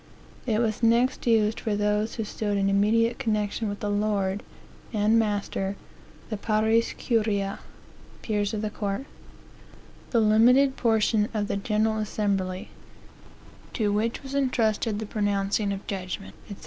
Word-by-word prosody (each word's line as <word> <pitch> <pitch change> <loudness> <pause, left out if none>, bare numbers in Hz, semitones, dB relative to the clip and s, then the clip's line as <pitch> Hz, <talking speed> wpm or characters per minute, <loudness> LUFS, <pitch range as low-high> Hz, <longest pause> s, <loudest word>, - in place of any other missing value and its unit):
It 220 -3 +2
was 220 -1 0
next 240 +3 +2
used 220 -1 +3
for 215 -2 -1
those 210 +1 0
who 225 - -2
stood 205 -1 -2
in 195 0 +2
immediate 230 +4 +2
connexion 215 -2 -1
with 205 - -6
the 205 - -1
lord 205 -1 0 0.5
and 215 +1 +3
master, 205 -2 -1 0.6
the 215 - -1
pares 220 +2 +1
curiae, 210 -4 0 0.6
(peers 205 -2 0
of 210 - -3
the 215 - -2
court,) 205 +5 -3 1.0
the 235 - +2
limited 245 +5 +5
portion 220 -3 +2
of 205 -1 0
the - - -1
general 215 +1 0
assembly, 195 -3 -2 1.0
to 210 -3 0
which 225 +5 -1
was 270 0 -8
entrusted 230 -5 +1
the 220 - -4
pronouncing 205 -1 0
of 195 0 -5
judgment," 190 0 -5 0.2
&c. 200 - -6
215 Hz, 140 wpm, -26 LUFS, 205-225 Hz, 1.0 s, limited